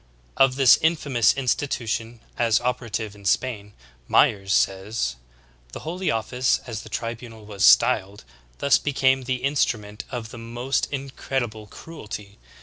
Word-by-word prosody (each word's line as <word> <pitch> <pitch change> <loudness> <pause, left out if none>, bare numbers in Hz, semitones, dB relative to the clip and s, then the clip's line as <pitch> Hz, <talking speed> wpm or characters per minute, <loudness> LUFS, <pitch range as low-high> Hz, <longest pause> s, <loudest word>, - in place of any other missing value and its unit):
Of 135 -1 +4
this 135 -2 +7
infamous 145 -8 +2
institution 120 -4 -2
as 115 -3 +2
opera 125 -1 -2
tive 110 -1 -3
in 100 -1 -16
Spain, 105 0 -1 0.3
Myers 100 -1 +3
says: 95 - 0 0.6
"The - - -7
Holy 180 +4 -3
Office, 120 +3 0
as 115 -3 -5
the 110 - -12
tribunal 115 -1 -6
was 100 -2 -4
styled, 95 +10 +4 0.3
thus 140 - +3
became 135 -2 +1
the 130 0 -2
instrument 115 -6 -1
of 115 -3 -5
the 120 - -10
most 120 +4 -2
incredi 135 -3 -3
ble 110 -1 -12
cruelty. 105 -9 -9
115 Hz, 140 wpm, -24 LUFS, 105-130 Hz, 0.6 s, this